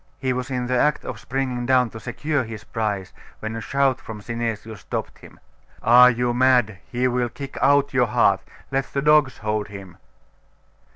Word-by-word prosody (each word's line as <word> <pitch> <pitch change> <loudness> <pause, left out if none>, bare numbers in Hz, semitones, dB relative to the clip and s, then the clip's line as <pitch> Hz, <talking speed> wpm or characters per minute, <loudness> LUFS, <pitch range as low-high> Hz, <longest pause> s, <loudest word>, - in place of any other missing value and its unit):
He 130 -1 -1
was 125 0 -4
in 125 -2 -2
the 125 +1 -1
act 150 +2 +1
of 115 - -6
springing 125 -1 -3
down 125 -3 +3
to 110 - -8
secure 150 +5 -2
his 110 -2 -8
prize, 105 -4 -3 0.3
when 110 +1 -5
a 115 - -4
shout 135 +1 +1
from 110 -1 -8
Synesius 115 -1 -4
stopped - - -5
him. - - -16 0.4
'Are 125 +2 +8
you 120 0 0
mad? 120 -5 +3
He 125 +1 +1
will 125 -1 0
kick 140 +3 -8
out 140 +1 +3
your 125 -2 +3
heart! 110 - +3 0.3
Let 135 0 -1
the 140 - -1
dogs 150 -3 +4
hold 105 -1 -1
him! 100 -3 -11
125 Hz, 180 wpm, -23 LUFS, 110-130 Hz, 0.4 s, Are